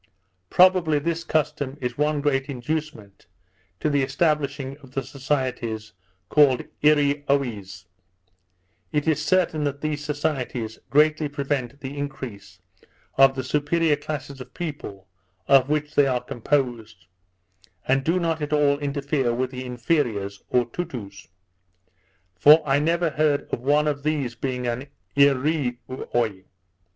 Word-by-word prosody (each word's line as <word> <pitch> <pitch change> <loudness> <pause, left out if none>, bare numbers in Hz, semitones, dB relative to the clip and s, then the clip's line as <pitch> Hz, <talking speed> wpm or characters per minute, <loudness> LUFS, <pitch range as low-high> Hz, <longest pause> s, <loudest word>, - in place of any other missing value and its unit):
Probably 180 -4 +5
this 165 +3 -2
custom 145 -4 -1
is 125 -2 -3
one 150 +1 0
great 135 -2 +1
inducement 130 -6 -5 0.5
to - - 0
the 145 -2 +2
establishing 140 -1 0
of 135 -3 -17
the 135 - -1
societies 125 -6 -3 0.3
called 140 -1 +4 0.2
Eareeoies. 140 -10 +1 1.1
It 150 +1 -1
is 150 -1 +2
certain 160 -1 +1
that 140 0 -3
these 150 -1 -2
societies 135 -7 -3
greatly 155 +1 +3
prevent 140 -2 -3
the 135 +1 -6
increase 120 -9 -7 0.6
of 135 0 +6
the 130 - -3
superior 150 +3 +1
classes 145 -2 -6
of 125 0 -12
people 125 - -6 0.4
of 135 -1 +5
which 150 0 -1
they 145 -1 +4
are 125 -2 0
composed, 120 - -2 0.8
and 135 +1 +2
do 170 +5 +1
not 165 -2 -1
at 150 0 -2
all 145 -1 +3
interfere 140 -3 -1
with 130 +1 -1
the 130 -1 -6
inferiors, 120 -6 -1
or 125 -1 +2
Toutous; 115 - -7 1.1
for 150 - +6
I 135 +1 +3
never 165 +2 +1
heard 150 -1 +1
of - - 0
one 145 +4 +2
of 145 -1 -1
these 145 -5 -1
being 125 +1 -3
an 120 +4 -3 0.3
Eareeoy. 130 -7 0
140 Hz, 130 wpm, -24 LUFS, 125-150 Hz, 1.1 s, of